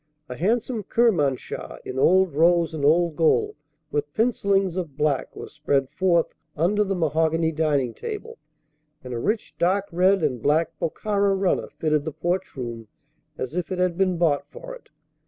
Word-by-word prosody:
A 125 - -6
handsome 225 - 0
Kermanshah 180 - 0
in 130 - -4
old 185 +2 +4
rose 170 +2 +3
and 155 -3 -4
old 165 +2 +3
gold 160 +1 +2 0.4
with 145 0 -2
pencillings 200 -5 +1
of 165 -7 -5
black 150 -3 0
was - - -9
spread 140 -3 0
forth 175 -1 +1 0.2
under 200 +7 +2
the 195 -1 -2
mahogany 160 0 +1
dining 145 -6 0
table, 460 - -7 0.6
and 125 -1 -7
a 120 - -3
rich 210 - -2
dark 190 +3 +2
red 185 +3 +3
and 125 -3 -1
black 155 +5 +2
Bokhara 200 +3 0
runner 190 -1 0
fitted 155 -2 +1
the 155 - -3
porch 175 +5 -2
room 120 -4 -6 0.5
as 130 - -4
if 180 +1 -3
it 185 - -2
had 180 -1 +1
been 185 -1 +1
bought 145 -4 +1
for - - -9
it. - - -14
170 Hz, 165 wpm, -24 LUFS, 150-195 Hz, 0.6 s, old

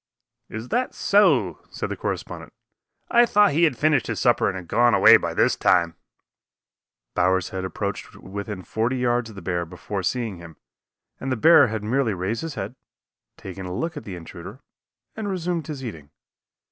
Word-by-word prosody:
"Is 110 +3 -7
that 250 +2 -1
so?" 145 - +3
said - - -5
the - - -3
correspondent. - - -5 0.6
"I 240 0 +5
thought 210 -1 +4
he 165 +4 +3
had 155 - 0
finished 155 -1 +2
his - - -3
supper 120 -2 +3
and 95 - -1
had 90 -2 -9
gone 120 -2 +3
away 95 - +8
by - - -4
this - - +3
time." 85 -2 +2 1.2
Bowers 90 0 +1
had 95 -1 -5
approached 95 - -4
to - - -15
within 100 0 -6
forty 115 +7 -1
yards 120 -1 0
of 110 - -12
the 95 - -10
bear 90 -1 -1
before 95 +4 -6
seeing 110 0 -2
him, 85 -2 -12 0.6
and 135 - -4
the - - +1
bear 145 +2 +6
had 110 -2 -4
merely 115 -1 0
raised 95 +6 -2
his 165 -3 -5
head, 100 +5 -5 0.6
taken 95 -1 -8
a 90 - -5
look 165 - -3
at 145 - -7
the 95 - -7
intruder 90 - -10 0.5
and 220 -2 -4
resumed 175 -4 -2
his 140 -4 -6
eating. 80 -11 -8
110 Hz, 185 wpm, -23 LUFS, 95-145 Hz, 1.2 s, away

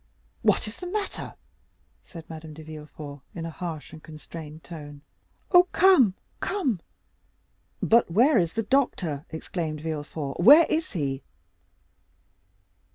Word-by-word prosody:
"What - - +2
is 215 - -8
the 360 - -7
matter?" 410 +2 -4 0.7
said 165 -3 -11
Madame 160 -1 -9
de 160 - -10
Villefort 150 -2 -9
in 165 -1 -4
a 165 - -5
harsh 160 -2 -6
and 155 - -10
constrained 155 0 -10
tone. 145 -4 -9 0.5
"Oh! 360 0 +7
come! 330 - +6 0.2
come!" 275 - -1 1.0
"But 230 -3 +4
where 235 - +5
is 170 -2 0
the 225 - -1
doctor?" 185 - 0
exclaimed 160 -1 -4
Villefort; 150 -2 -4
"where 290 - +9
is 315 -4 -1
he?" 140 -6 -2
165 Hz, 125 wpm, -26 LUFS, 155-235 Hz, 1.0 s, where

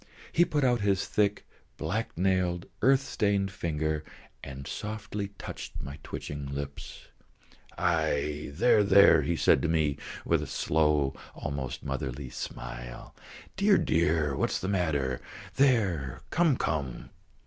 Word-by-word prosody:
He 175 - +4
put 145 -4 0
out 120 -3 +3
his 100 -1 +1
thick, 105 -1 +1 0.3
black - - -3
nailed, 90 -1 +1 0.2
earth 135 +1 +5
stained 100 -6 0
finger 80 -5 -2 0.4
and 70 0 -7
softly 105 +1 -4
touched - - -7
my 70 +2 -7
twitching 70 0 -6
lips. 70 0 -7 0.7
"Aïe, 75 -3 0
there, 110 0 +5
there," 100 0 +7
he 85 - 0
said - - +4
to - - +1
me 80 -3 +1 0.3
with - - +2
a - - -5
slow, 75 -3 +1 0.2
almost 70 -3 -4
motherly 65 -1 -4
smile. - - -7 0.4
"Dear, 200 +1 +4
dear, 80 -3 +2
what - - +1
is - - -1
the 95 - -3
matter? 75 -9 0 0.4
There; 100 - +2
come, 165 -6 +3
come!" 70 -6 -3
80 Hz, 130 wpm, -29 LUFS, 70-100 Hz, 0.7 s, there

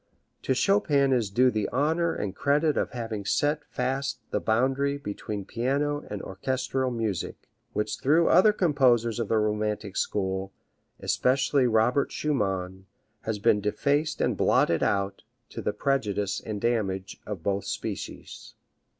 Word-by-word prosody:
To 130 - 0
Chopin 145 -7 +3
is 115 -5 +1
due 125 +6 +4
the 110 -2 -1
honor 160 +5 +1
and 100 -1 -4
credit 145 +2 +2
of - - 0
having 115 -4 -5
set 145 +9 +1
fast 135 +1 -2
the - - +1
boundary 135 +5 +1
between 105 -5 -5
piano 140 +6 -1
and 105 -1 -5
orchestral 130 +6 -2
music, 110 -7 -3 0.3
which 105 0 -2
through 160 +5 +3
other 190 +5 +6
composers 130 - +2
of 115 - -1
the 110 - +2
romantic 105 -1 -1
school, 95 -1 -2 0.5
especially 130 0 +2
Robert 120 +4 +2
Schumann, 95 -9 -2 0.4
has 110 -1 -1
been 105 0 +3
defaced 145 +9 0
and - - +1
blotted - - +3
out, 100 0 0 0.3
to - - -6
the - - 0
prejudice 105 -4 -1
and 105 -2 -4
damage 100 -5 -1
of 100 -6 -5
both 100 +1 -1
species." - - -6
120 Hz, 140 wpm, -27 LUFS, 105-140 Hz, 0.5 s, other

